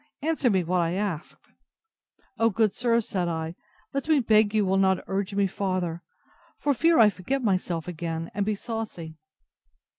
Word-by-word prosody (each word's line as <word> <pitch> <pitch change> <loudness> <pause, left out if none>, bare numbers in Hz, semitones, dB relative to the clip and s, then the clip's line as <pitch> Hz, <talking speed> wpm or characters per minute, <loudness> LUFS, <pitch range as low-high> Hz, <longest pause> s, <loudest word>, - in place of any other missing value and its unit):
Answer 305 -5 +1
me 190 -4 +2
what 180 +1 +1
I 170 0 0
asked. 190 -5 -4 0.9
O, 230 0 +4
good 215 -1 +1
sir, 235 -1 +2
said 185 -5 -2
I, 160 -1 -3 0.4
let 275 +3 -3
me 310 -2 +5
beg 215 -3 +4
you 215 -1 +2
will 190 +1 +2
not 190 -1 +2
urge 195 +1 -2
me 200 0 +3
farther, 185 -3 -2 0.6
for 290 - +1
fear 330 +5 +3
I 215 -3 +7
forget 255 +9 -3
myself 185 -5 -1
again, 165 -1 -4
and 200 0 0
be 210 +1 0
saucy. 200 -8 -6
195 Hz, 170 wpm, -26 LUFS, 175-225 Hz, 0.9 s, I